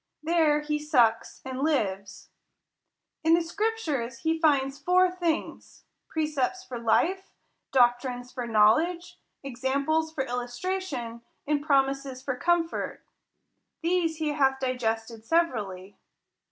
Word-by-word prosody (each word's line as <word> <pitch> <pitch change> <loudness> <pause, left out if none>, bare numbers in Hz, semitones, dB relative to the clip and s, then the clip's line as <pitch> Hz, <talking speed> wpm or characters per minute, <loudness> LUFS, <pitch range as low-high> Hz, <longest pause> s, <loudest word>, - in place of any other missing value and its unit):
There 315 -2 +3
he 300 0 -2
sucks, 245 -7 +1
and 260 0 -5
lives. 200 -10 -1 0.9
In 325 +1 +5
the 340 - +1
scriptures 330 - -2
he 320 0 0
tinds 280 -3 +2
four 360 +4 +3
things; 345 -3 -3 0.2
precepts 310 +3 -1
for 250 -9 -7
life, 370 - +1 0.4
doctrines 245 0 +2
for 245 -2 -5
knowledge, 235 +12 +2 0.2
examples 275 +5 -1
for 300 -4 -2
illustration, 245 0 -4 0.2
and 290 0 0
promises 275 -2 0
for 260 - -2
comfort. 340 +4 -1 0.8
These 335 -2 +1
he 310 -1 -1
hath 270 -3 +2
digested 230 -3 -2
severally. 215 - -1
280 Hz, 110 wpm, -27 LUFS, 245-325 Hz, 0.9 s, In